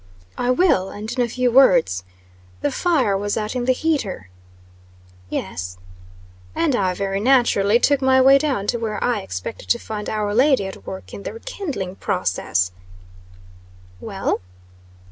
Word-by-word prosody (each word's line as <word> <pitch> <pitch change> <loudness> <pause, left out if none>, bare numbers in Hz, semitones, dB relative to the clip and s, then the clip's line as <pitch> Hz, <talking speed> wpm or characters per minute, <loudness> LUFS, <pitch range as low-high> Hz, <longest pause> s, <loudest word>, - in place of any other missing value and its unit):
"I 245 - -1
will; 250 - +3
and 215 +2 -7
in 250 - +2
a 235 - -2
few 250 +1 0
words. 175 - +4 0.6
The 145 - 0
fire 285 - +1
was 205 +1 -1
out 215 +2 -3
in 245 -1 -1
the 255 - +4
heater." 250 - -1 1.0
"Yes." 90 -1 -4 0.8
"And 310 -6 +1
I 185 -5 0
very 195 0 -2
naturally 235 -3 +4
took 285 +1 +2
my 260 0 +4
way 270 +1 +7
down 270 -9 -1
to 235 - -2
where 215 -2 -3
I 245 -3 +1
expected 95 - -7
to - - +4
find 210 -1 -6
our 210 -1 -1
lady 255 -2 +3
at 190 - -9
work 190 - -8
in - - -7
the - - -6
re 455 - -9
kindling 265 - -5
process." 95 - -1 1.3
"Well?" - - -2
215 Hz, 155 wpm, -21 LUFS, 190-260 Hz, 1.3 s, way